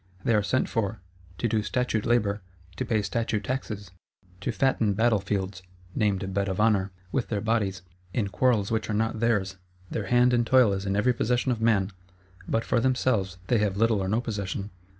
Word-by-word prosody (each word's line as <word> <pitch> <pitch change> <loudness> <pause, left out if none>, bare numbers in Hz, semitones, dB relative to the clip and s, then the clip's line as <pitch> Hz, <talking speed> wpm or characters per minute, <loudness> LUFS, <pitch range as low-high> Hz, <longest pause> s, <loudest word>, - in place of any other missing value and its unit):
They 115 - +2
are 105 - +4
sent 130 +6 +1
for, 110 -1 -2 0.4
to 120 - 0
do 110 -1 +1
statute 110 +2 -1
labour, 105 -4 +2 0.4
to - - -2
pay 110 -4 +1
statute 105 +2 -1
taxes; 105 -6 -4 0.5
to - - -2
fatten 115 -6 +1
battle 110 0 +3
fields 95 -1 -3 0.3
(named 95 -2 0
"Bed 100 +1 0
of 95 - -3
honour") 105 -3 +3 0.2
with 125 - -1
their 105 - -1
bodies, 100 -4 0 0.3
in 100 +1 -1
quarrels 110 -2 +2
which 110 -1 -1
are 105 - 0
not 110 +1 0
theirs; 105 -5 +1 0.3
their 105 -4 -3
hand 125 +2 +4
and 120 -1 +2
toil 125 -5 +5
is 100 0 -3
in 100 - 0
every 125 +5 +3
possession 125 +2 +1
of 115 -2 -2
man; 105 -4 +2 0.6
but 115 - 0
for - - +2
themselves 115 -7 +1
they 115 +4 +2
have 100 -2 0
little 110 -2 +3
or 95 - -1
no 110 +4 +1
possession. 100 -3 -4
105 Hz, 190 wpm, -27 LUFS, 100-115 Hz, 0.6 s, toil